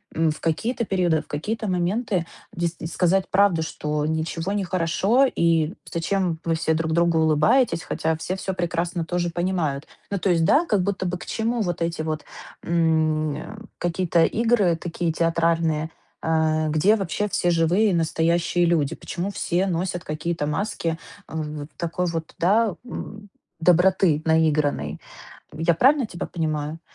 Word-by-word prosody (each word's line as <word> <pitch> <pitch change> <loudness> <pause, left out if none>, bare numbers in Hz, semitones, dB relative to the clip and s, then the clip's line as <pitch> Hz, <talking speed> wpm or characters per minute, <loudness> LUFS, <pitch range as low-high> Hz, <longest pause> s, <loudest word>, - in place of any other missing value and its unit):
м, 160 -1 +2
в 155 - -7
какие-то 225 +9 -1
периоды, 175 -5 +1
в - - -20
какие-то 215 +9 -3
моменты 185 +1 0 0.3
дес 170 0 -2
э, - - -6
сказать 185 +2 +1
правду, 190 -4 +3
что 150 -1 -2
ничего 160 +4 -2
не 205 - 0
хорошо 185 +8 +2
и 165 - +1 0.2
зачем 170 0 -1
вы 165 -1 +1
все 160 0 0
друг 160 0 -1
другу 170 0 +3
улыбаетесь, 160 - +3
хотя 160 0 -1
все 180 +4 -4
всё 190 0 -3
прекрасно 175 -1 -2
тоже 175 +1 -1
понимают. 170 -5 -2 0.2
Ну, 200 - -2
то 190 - 0
есть, 165 -2 +3
да, 310 - +4
как 205 - +1
будто 190 -1 -2
бы 180 0 -2
к - - -10
чему 230 +2 -1
вот 175 -3 -2
эти 165 -1 -1
вот, 155 -1 -3 0.4
м, 160 -3 +1
а, 215 0 -8 0.2
какие-то 175 -1 +1
игры 215 -5 +2
такие 170 0 -2
театральные? 165 -1 +1 0.4
А, 155 -1 +1
где 160 +8 +4
вообще 210 +1 -2
все 175 -3 0
живые 175 +6 +3
и - - 0
настоящие 170 +1 +1
люди? 160 -5 +1
Почему 180 +2 -4
все 190 -1 -1
носят 175 0 -2
какие-то 155 0 -2
маски, 165 0 -2 0.3
а, - - -9
в 150 -2 -4
такой 170 +1 -2
вот, 165 -1 -4
да, 205 +2 +3
м, 210 -4 -8 0.3
доброты 180 -2 +4
наигранной? 150 - +1 0.5
Я 165 +2 +1
правильно 265 - +4
тебя 175 -4 -6
понимаю? 155 -1 -3
170 Hz, 160 wpm, -23 LUFS, 160-190 Hz, 0.5 s, да